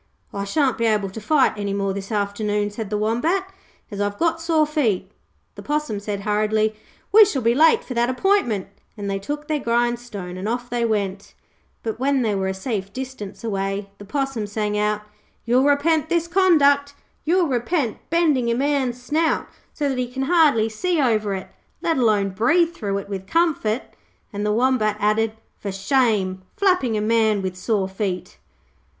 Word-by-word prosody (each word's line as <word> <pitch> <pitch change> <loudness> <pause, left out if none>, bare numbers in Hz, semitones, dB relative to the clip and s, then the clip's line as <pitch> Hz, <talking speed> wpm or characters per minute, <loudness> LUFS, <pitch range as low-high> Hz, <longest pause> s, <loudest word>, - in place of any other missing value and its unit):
'I 200 0 -3
shan't 265 +4 +1
be 230 - +1
able 210 -3 +1
to 220 - -8
fight 275 +4 +3
any 200 -1 -3
more 195 -1 -1
this 195 +2 -6
afternoon,' 205 0 -1
said 210 -1 -5
the 210 - -1
Wombat, 315 - 0 0.4
'as 200 0 -4
I've 205 0 -1
got 330 -1 +1
sore 325 -2 +2
feet.' 225 - 0 0.4
The - - -10
Possum 295 -8 -2
said 205 -1 -4
hurriedly, 215 +1 +1 0.4
'We 430 +1 +9
shall 270 - -2
be 230 +1 +4
late 315 +5 +5
for 255 - -6
that 240 0 +1
appointment', 255 - +1 0.3
and 205 -1 -5
they 195 0 -1
took 295 +8 -5
their 305 -1 0
grindstone 235 -6 -2
and 195 +4 -3
off 245 +1 -3
they 240 -1 0
went. 200 -3 -2 0.5
But 225 0 -3
when 270 0 +2
they 215 -2 +1
were 190 -1 -1
a 190 - -1
safe 195 -1 -3
distance 255 -5 -7
away 195 -2 -2
the 205 - -10
Possum 270 -2 -2
sang 210 0 -2
out: 210 0 0 0.4
'You'll 250 +3 +3
repent 300 +2 +2
this 340 -1 +1
conduct. 285 -6 +3 0.3
You'll 350 +3 +3
repent 255 -2 -1
bending 300 -8 +2
a 235 - +2
man's 265 -2 0
snout 310 +6 0 0.2
so 295 - -2
that 265 -2 -1
he 250 -1 -2
can 265 +1 -2
hardly 290 -8 +4
see 340 +10 -1
over 215 -7 +1
it, 190 - -7 0.3
let 330 -3 +1
alone 210 -5 +2
breathe 330 - +2
through 200 -9 -2
it 200 - -5
with 190 -1 -6
comfort', 295 - +1 0.5
and 205 0 -3
the 210 - +1
Wombat 220 -2 +2
added, 215 +1 +1 0.3
'For 200 - -4
shame, 195 -2 +1 0.2
flapping 365 - +2
a - - 0
man 220 -2 +2
with 185 -1 -3
sore 195 0 0
feet.' 190 -2 -4
230 Hz, 180 wpm, -22 LUFS, 205-285 Hz, 0.5 s, We